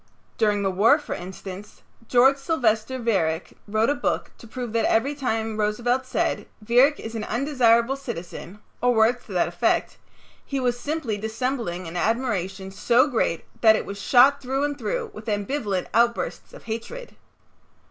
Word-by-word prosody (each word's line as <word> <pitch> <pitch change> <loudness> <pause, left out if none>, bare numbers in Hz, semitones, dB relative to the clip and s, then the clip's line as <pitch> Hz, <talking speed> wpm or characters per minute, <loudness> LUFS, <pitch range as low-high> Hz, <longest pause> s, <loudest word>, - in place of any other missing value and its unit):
During 210 -2 +2
the 195 - +1
war, 220 +10 +5
for 295 - -6
instance, 190 +2 -9 0.2
George 265 +3 +5
Sylvester 260 -5 0
Viereck 185 -9 -1
wrote 220 +5 +2
a - - +3
book 285 - -2
to 230 - -12
prove 240 0 -6
that 230 -1 +1
every 260 +6 +2
time 225 -5 -2
Roosevelt 240 +5 0
said, - - -1
"Viereck 245 +7 +3
is 225 - -7
an 220 -2 -4
undesirable 245 -1 +2
citizen," 205 - -7 0.2
or 245 0 +3
words 230 +3 +3
to - - -9
that - - +2
effect, - - 0 0.5
he 275 - -3
was 245 -1 0
simply 285 -7 -3
dissembling 220 -5 -3
an 165 - -8
admiration 195 -3 -1
so 240 +6 +3
great 225 - -1 0.2
that 220 -1 +7
it - - -2
was 200 0 -7
shot 270 +5 +5
through 270 +1 -1
and 290 -1 -2
through 485 -3 -3
with 410 - -11
ambivalent 205 -2 -1
outbursts 235 0 0
of - - -13
hatred. 235 - -7
235 Hz, 160 wpm, -24 LUFS, 210-265 Hz, 0.5 s, that